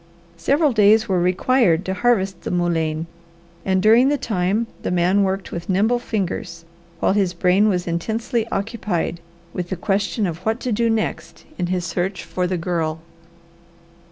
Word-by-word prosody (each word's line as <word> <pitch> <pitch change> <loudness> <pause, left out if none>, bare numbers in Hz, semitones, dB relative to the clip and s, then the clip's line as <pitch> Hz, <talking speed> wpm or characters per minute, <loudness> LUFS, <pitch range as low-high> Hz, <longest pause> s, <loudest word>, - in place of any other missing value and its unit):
Several 280 - +2
days 215 +1 +5
were 185 -3 +1
required 185 0 +2
to 190 - -1
harvest 195 -3 +1
the - - -5
mullein 165 -3 0 0.6
and 190 -1 +1
during 230 +5 +6
the 290 - +1
time 205 -1 0 0.2
the - - -3
man 180 +3 +2
worked 195 0 -1
with 170 +2 -6
nimble 215 +6 +2
fingers, 180 -7 -4 0.3
while - - +2
his 190 -3 +1
brain 185 +4 +3
was 180 -3 0
intensely 220 +7 -2
occupied 200 -6 -2 0.3
with 175 -1 -4
the 190 - -2
question 200 +3 -1
of 170 -3 -3
what 220 +5 -1
to 250 - -2
do 230 +2 +1
next 225 -1 -3
in 175 - 0
his 180 -1 -1
search 180 +3 -2
for 180 -1 -2
the 185 0 -1
Girl. 165 -2 -2
190 Hz, 160 wpm, -21 LUFS, 175-220 Hz, 0.6 s, during